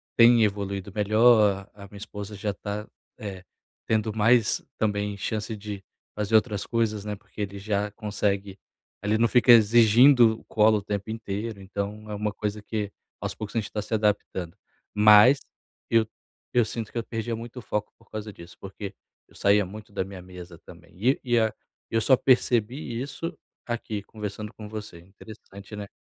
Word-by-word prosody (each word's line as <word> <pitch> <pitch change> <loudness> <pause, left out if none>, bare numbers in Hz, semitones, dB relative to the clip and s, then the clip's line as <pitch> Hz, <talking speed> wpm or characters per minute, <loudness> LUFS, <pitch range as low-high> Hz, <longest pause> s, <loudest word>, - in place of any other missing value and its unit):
tem 115 -1 +7
evoluído 100 -1 -2
melhor 105 -2 +4
a 100 - -12
a - - -12
minha 100 - -12
esposa 105 0 -7
já 100 0 -2
tá, 105 +3 -5 0.3
eh, 95 -3 -7 0.5
tendo 110 -1 +1
mais 115 +1 +3
também 105 -1 -1
chance 105 +2 -3
de 100 -1 -7 0.3
fazer 105 +1 0
outras 105 -2 +2
coisas, 110 -3 0
né, 105 0 -4
porque 105 +1 -11
ele 100 -1 -4
já 105 0 -1
consegue 100 -2 -2 0.5
ele 105 +1 +2
não 115 - +4
fica 120 +2 +5
exigindo 115 +1 +6
colo 110 0 +4
o - - -3
tempo 100 +1 -4
inteiro, 110 -1 -5
então 100 +2 -5
é 105 - -4
uma 105 0 -2
coisa 105 0 -3
que 105 -1 -3 0.3
aos - - -4
poucos 110 0 -7
a - - +3
gente 105 - -4
está 105 - -5
se 105 - -7
adaptando. 105 -4 -1 0.4
Mas 105 +6 +7 0.5
eu 115 -1 +4 0.5
eu 120 - +5
sinto 115 -1 -5
que - - -6
eu 115 - -1
perdia 115 +1 -3
muito 120 +2 -8
foco 105 -2 -3
por - - -24
causa 110 0 -6
disso, 85 -1 -13
porque 95 0 -7 0.4
eu - - -22
saía 100 0 +3
muito 105 +3 -10
da 100 - -1
minha 95 -1 -9
mesa 90 -1 -11
também - - -15
e 125 +8 +2
e 120 -3 +1 0.6
eu 115 - +2
só 130 +4 +5
percebi 120 -1 +1
isso 150 +5 -5 0.3
aqui 115 -3 -3
conversando 105 0 -6
com 105 - -9
você. 105 -5 -8
Interessante, 100 +2 -12
né? 105 -1 -6
105 Hz, 175 wpm, -26 LUFS, 100-115 Hz, 0.6 s, tem